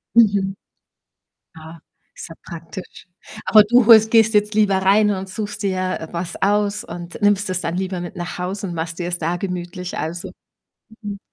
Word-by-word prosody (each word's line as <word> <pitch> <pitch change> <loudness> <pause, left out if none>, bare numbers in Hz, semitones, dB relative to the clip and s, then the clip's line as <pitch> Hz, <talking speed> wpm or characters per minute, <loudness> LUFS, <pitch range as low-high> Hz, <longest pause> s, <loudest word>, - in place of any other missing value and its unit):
Mhm. 200 -4 +3 1.0
Ah. 160 +1 -11 0.4
Ist - - -8
ja 165 - -11
praktisch. 170 +2 -10 0.4
Aber 215 -1 +6
du 240 +2 +4
holst 220 -2 +8
gehst 225 -1 +4
jetzt 210 +1 +2
lieber 210 -2 +3
rein 200 +2 +3
und 190 -1 -3
suchst 205 +3 -4
dir, 185 -1 -1
äh, 160 - -7
was 170 0 -5
aus 205 +2 +1
und 175 -4 -9
nimmst 205 -1 +2
es 185 -1 -1
dann 165 -1 -3
lieber 185 -1 -3
mit 175 +2 -7
nach 175 0 -5
Hause 190 +2 -4
und 175 - -5
machst 165 0 -4
dir 175 - -2
es 175 0 -2
da 170 +2 -1
gemütlich, 180 -1 -5
also. 170 +2 -4 0.7
Mhm. 205 -1 -6
190 Hz, 180 wpm, -20 LUFS, 175-205 Hz, 1.0 s, holst